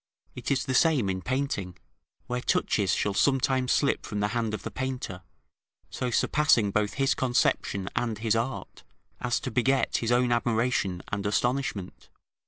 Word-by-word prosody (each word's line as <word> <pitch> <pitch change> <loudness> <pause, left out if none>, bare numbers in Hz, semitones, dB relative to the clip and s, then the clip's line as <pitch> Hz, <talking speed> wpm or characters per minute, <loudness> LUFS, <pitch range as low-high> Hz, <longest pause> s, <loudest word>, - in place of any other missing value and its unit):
It - - -5
is 135 -2 +1
the 130 - -2
same 130 - +3
in 95 0 -4
painting, 125 -9 -2 0.5
where 125 0 -3
touches 100 -6 +1
shall 105 - 0
sometimes 130 +1 +2
slip 145 - +2
from 105 - -4
the 105 0 +1
hand 115 -1 -1
of - - -9
the - - -5
painter, 130 -8 -4 0.7
so 125 - -2
surpassing 120 -4 +3
both 105 0 0
his 135 0 +2
conception 120 -6 0
and 115 -3 -1
his 110 0 +1
art, 120 +4 -3 0.4
as 120 - 0
to 130 - -4
beget 130 +3 +2
his 115 0 -1
own 120 0 +3
admiration 115 -6 0
and 105 -1 -3
astonishment. 120 -3 -2
120 Hz, 160 wpm, -27 LUFS, 105-130 Hz, 0.7 s, same